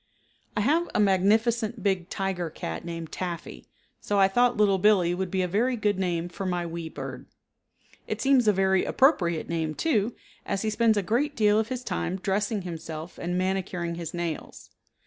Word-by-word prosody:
I -, -, +2 dB
have 320 Hz, +9 st, +2 dB
a -, -, +3 dB
magnificent 220 Hz, +4 st, +2 dB
big 190 Hz, -3 st, 0 dB
tiger 190 Hz, -3 st, -2 dB
cat 80 Hz, -, -5 dB
named 165 Hz, -1 st, -6 dB
Taffy, 170 Hz, -, -6 dB, 0.3 s
so 205 Hz, -, -1 dB
I 195 Hz, -1 st, +6 dB
thought 245 Hz, +4 st, +2 dB
Little 200 Hz, -2 st, +3 dB
Billee 185 Hz, -4 st, +4 dB
would 185 Hz, +1 st, -2 dB
be 185 Hz, 0 st, 0 dB
a -, -, 0 dB
very 230 Hz, +8 st, +1 dB
good 210 Hz, -3 st, 0 dB
name 175 Hz, -2 st, -1 dB
for 175 Hz, +3 st, -7 dB
my 180 Hz, -2 st, -1 dB
wee 165 Hz, -1 st, -5 dB
bird. -, -, -7 dB, 0.8 s
It -, -, -3 dB
seems 265 Hz, -4 st, +3 dB
a -, -, +7 dB
very 190 Hz, -1 st, +2 dB
appropriate 175 Hz, -, +2 dB
name 160 Hz, -2 st, -2 dB
too, 230 Hz, -, +1 dB, 0.3 s
as 195 Hz, -, -2 dB
he 215 Hz, -, 0 dB
spends 220 Hz, 0 st, +3 dB
a 200 Hz, -, +1 dB
great 275 Hz, +9 st, 0 dB
deal 210 Hz, -1 st, +4 dB
of 220 Hz, -, 0 dB
his 255 Hz, +1 st, -4 dB
time 185 Hz, -, -2 dB
dressing 205 Hz, +2 st, -1 dB
himself 165 Hz, -1 st, -7 dB
and 175 Hz, +1 st, -2 dB
manicuring 185 Hz, -2 st, -1 dB
his 170 Hz, -2 st, -5 dB
nails. 170 Hz, -2 st, -5 dB
190 Hz, 185 wpm, -27 LUFS, 175-215 Hz, 0.8 s, a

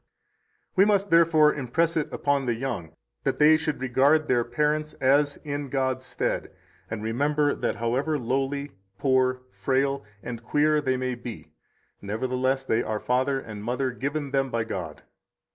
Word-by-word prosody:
108 -, -, -36 dB
We 195 Hz, -, +7 dB
must, 200 Hz, 0 st, +1 dB
therefore, 165 Hz, -2 st, +5 dB
impress 155 Hz, +5 st, 0 dB
it 155 Hz, -2 st, -1 dB
upon 140 Hz, -2 st, 0 dB
the 120 Hz, -, +1 dB
young 90 Hz, -11 st, -4 dB, 0.3 s
that -, -, 0 dB
they 155 Hz, +1 st, +7 dB
should 155 Hz, -2 st, -2 dB
regard 135 Hz, +5 st, +3 dB
their 120 Hz, -2 st, +3 dB
parents 150 Hz, +5 st, 0 dB
as 140 Hz, +2 st, +2 dB
in 145 Hz, -2 st, -4 dB
God's 130 Hz, -1 st, -1 dB
stead, -, -, -2 dB, 0.4 s
and 110 Hz, -1 st, -4 dB
remember 145 Hz, +6 st, +1 dB
that -, -, -2 dB
however 130 Hz, +7 st, 0 dB
lowly, 135 Hz, +3 st, -2 dB, 0.3 s
poor, 130 Hz, -1 st, +2 dB
frail, 135 Hz, 0 st, 0 dB, 0.2 s
and 120 Hz, -2 st, -6 dB
queer 150 Hz, +5 st, +2 dB
they 130 Hz, -2 st, 0 dB
may 130 Hz, 0 st, -2 dB
be, 120 Hz, -2 st, -8 dB, 0.5 s
nevertheless 130 Hz, +5 st, -1 dB
they 115 Hz, -3 st, +1 dB
are 110 Hz, -2 st, -2 dB
father 130 Hz, +3 st, +1 dB
and 105 Hz, -5 st, -8 dB
mother 125 Hz, +3 st, -1 dB
given 140 Hz, +3 st, -3 dB
them 135 Hz, -1 st, +1 dB
by 115 Hz, -2 st, -1 dB
God. 90 Hz, -8 st, -6 dB
135 Hz, 160 wpm, -26 LUFS, 125-145 Hz, 0.5 s, We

